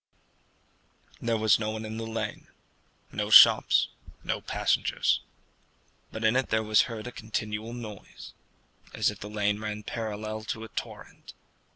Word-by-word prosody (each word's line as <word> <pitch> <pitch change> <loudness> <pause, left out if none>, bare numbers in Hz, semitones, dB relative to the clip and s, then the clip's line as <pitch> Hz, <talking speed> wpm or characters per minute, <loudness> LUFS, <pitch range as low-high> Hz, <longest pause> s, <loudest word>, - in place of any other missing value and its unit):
There 115 -1 0
was 110 -2 +4
no 110 -1 -2
one 110 0 -5
in 110 +1 -6
the 115 0 -5
lane 115 0 -5 0.6
no - - -3
shops, - - +7 0.3
no - - -2
passengers; - - 0 0.9
but 110 - -6
in 110 +2 +3
it 130 0 +1
there 110 0 +1
was 110 +3 +3
heard 110 -2 -6
a 125 - -6
continual 110 0 -4
noise, 110 -4 -10 0.6
as - - +2
if - - -12
the 105 - -7
lane 105 -1 0
ran 105 0 -5
parallel 110 0 -5
to 110 0 -4
a 110 - -9
torrent. - - -8
110 Hz, 150 wpm, -28 LUFS, 105-115 Hz, 0.9 s, shops